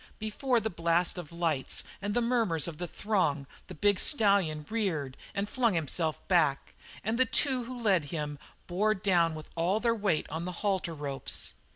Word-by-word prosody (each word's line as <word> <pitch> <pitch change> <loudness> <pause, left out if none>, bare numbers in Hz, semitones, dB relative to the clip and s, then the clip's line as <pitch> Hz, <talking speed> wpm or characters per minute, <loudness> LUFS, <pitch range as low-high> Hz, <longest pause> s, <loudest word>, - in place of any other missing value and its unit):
Before 235 +3 0
the 220 0 -3
blast 170 +1 +1
of 170 -3 -8
lights 165 -5 0 0.2
and 205 +1 -2
the 240 - +2
murmurs 225 - +1
of 160 -3 -7
the 175 - -3
throng 170 -9 0 0.2
the 185 - -9
big 200 +4 +2
stallion 200 - +3
reared 170 -12 -2 0.2
and 200 +1 -1
flung 235 -4 +1
himself 160 0 -1
back, 160 -7 +2 0.3
and 225 +4 -1
the 260 - +5
two 255 0 +1
who 255 +1 -7
lead 195 -9 +2
him 150 -2 -4 0.3
bore 210 +5 +1
down 175 -5 +2
with 155 -1 -9
all 175 +5 +1
their 235 0 +2
weight 200 -8 0
on 160 +2 -3
the 180 - -3
halter 190 -5 0
ropes. 140 -2 -3
180 Hz, 180 wpm, -30 LUFS, 160-215 Hz, 0.3 s, the